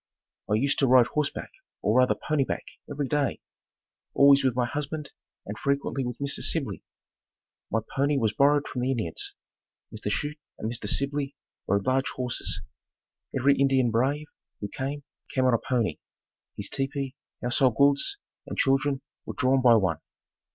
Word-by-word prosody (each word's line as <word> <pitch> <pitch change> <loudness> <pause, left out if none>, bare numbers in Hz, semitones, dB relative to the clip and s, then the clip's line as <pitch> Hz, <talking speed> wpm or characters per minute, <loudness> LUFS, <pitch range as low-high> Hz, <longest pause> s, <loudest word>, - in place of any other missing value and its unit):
I 105 - +3
used 135 +6 +2
to 135 - +4
ride 125 -1 +7
horseback, 150 +3 -2 0.3
or 110 +5 +4
rather 125 0 +4
"pony 150 -2 0
back," - - -3 0.3
every 145 -1 -2
day, 145 -1 0 0.8
always 140 0 +7
with 130 -3 +2
my 125 -1 +2
husband 150 +3 -4 0.3
and 105 +2 -6
frequently 140 -1 0
with 125 -1 -4
Mr. 140 0 -2
Sibley. 130 - -1 0.9
My 115 - +1
pony 140 +1 +2
was 110 -4 +1
borrowed 145 +1 +3
from 125 - -4
the 125 - 0
Indians. 110 -11 -2 0.6
Mr. - - -4
Chute 150 +1 -2 0.2
and 110 - -3
Mr. 115 -3 -4
Sibley 140 0 -1 0.3
rode 100 0 +1
large 130 +1 +2
horses. 125 -2 -2 0.7
Every 140 +2 +4
Indian 135 -3 +3
brave, 135 +6 +1 0.3
who 100 - -4
came, 140 +5 -4 0.3
came 130 -1 +3
on 130 - +4
a 115 - +3
pony. 120 -5 -1 0.6
His 100 - -1
tepee, 135 +1 -3 0.3
household 125 0 +2
goods 140 - +3 0.3
and - - -6
children 135 0 +2 0.3
were - - -5
drawn 130 0 +3
by 120 -2 +7
one. 95 -7 +1
135 Hz, 160 wpm, -27 LUFS, 120-140 Hz, 0.9 s, ride